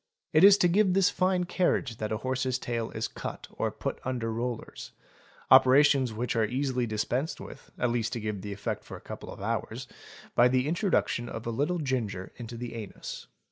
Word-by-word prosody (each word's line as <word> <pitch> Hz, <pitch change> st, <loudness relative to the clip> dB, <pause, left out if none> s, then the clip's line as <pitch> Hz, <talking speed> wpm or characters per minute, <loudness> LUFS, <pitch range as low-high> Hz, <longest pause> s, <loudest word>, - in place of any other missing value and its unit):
It 155 Hz, +3 st, +6 dB
is 200 Hz, 0 st, +9 dB
to 180 Hz, -, +4 dB
give 190 Hz, +1 st, +3 dB
this 195 Hz, -2 st, +4 dB
fine 185 Hz, -1 st, +1 dB
carriage 175 Hz, -, 0 dB
that. 110 Hz, 0 st, -3 dB
a 110 Hz, -, 0 dB
horse's 130 Hz, +1 st, -1 dB
tail 115 Hz, -3 st, -3 dB
is 110 Hz, -, -3 dB
cut -, -, -7 dB
or -, -, -1 dB
put -, -, -4 dB
under 120 Hz, -3 st, -2 dB
rollers, 120 Hz, 0 st, -5 dB, 0.6 s
operations 130 Hz, 0 st, +6 dB
which 120 Hz, +2 st, -2 dB
are 115 Hz, -, +3 dB
easily 125 Hz, 0 st, -1 dB
dispensed 120 Hz, +8 st, -1 dB
with, 135 Hz, -, -11 dB
at'least 120 Hz, -1 st, 0 dB
to 120 Hz, -, -2 dB
give 105 Hz, -1 st, -3 dB
an -, -, -6 dB
effect 100 Hz, +1 st, -4 dB
for -, -, -9 dB
a -, -, -18 dB
couple -, -, -7 dB
of -, -, -10 dB
hours, -, -, -3 dB, 0.5 s
by 120 Hz, -, +6 dB
the 130 Hz, +2 st, +1 dB
introduction 160 Hz, -, 0 dB
of 115 Hz, -, -6 dB
a 115 Hz, -, -1 dB
little 145 Hz, +10 st, 0 dB
ginger 120 Hz, -, -2 dB
into 120 Hz, -1 st, -7 dB
the 120 Hz, 0 st, -5 dB
anus. 110 Hz, -4 st, -7 dB
125 Hz, 190 wpm, -29 LUFS, 115-145 Hz, 0.6 s, is